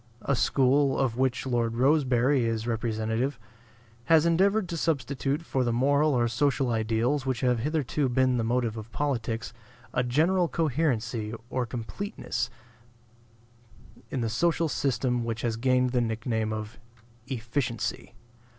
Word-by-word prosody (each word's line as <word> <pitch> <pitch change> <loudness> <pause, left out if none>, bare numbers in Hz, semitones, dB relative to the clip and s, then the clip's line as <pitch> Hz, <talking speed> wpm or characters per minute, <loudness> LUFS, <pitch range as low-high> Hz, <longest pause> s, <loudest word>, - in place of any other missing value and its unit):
A 140 - +1
school, 135 +2 +3
of 130 -4 0
which 130 0 0
Lord 120 -3 0
Rosebery 130 -1 +3
is 115 -1 -1
representative, 115 +2 -1 0.7
has 160 -1 +5
endeavored 190 +4 +3
to 170 - -3
substitute 145 -2 -1
for 135 -5 -1
the 120 - 0
moral 140 +4 +3
or 120 -1 +2
social 130 +2 +1
ideals 115 +5 0
which 130 -3 -1
have 125 -2 +2
hitherto 145 0 0
been 130 0 +2
the 115 - 0
motive 115 -1 0
of 110 +1 -8
politics 115 -5 -2 0.4
a 125 - +2
general 165 +9 +2
coherency 120 -9 -1 0.2
or 125 -2 -1
completeness 125 - -4 1.6
in 130 - -2
the 115 - 0
social 165 +7 +1
system 125 -4 0
which 115 -1 -3
has 115 -2 0
gained 125 +1 +2
the 125 -1 +2
nick 115 -1 -3
name 110 -3 0
of 110 +2 -5 0.5
"efficiency." 120 -1 -3
125 Hz, 140 wpm, -27 LUFS, 115-140 Hz, 1.6 s, has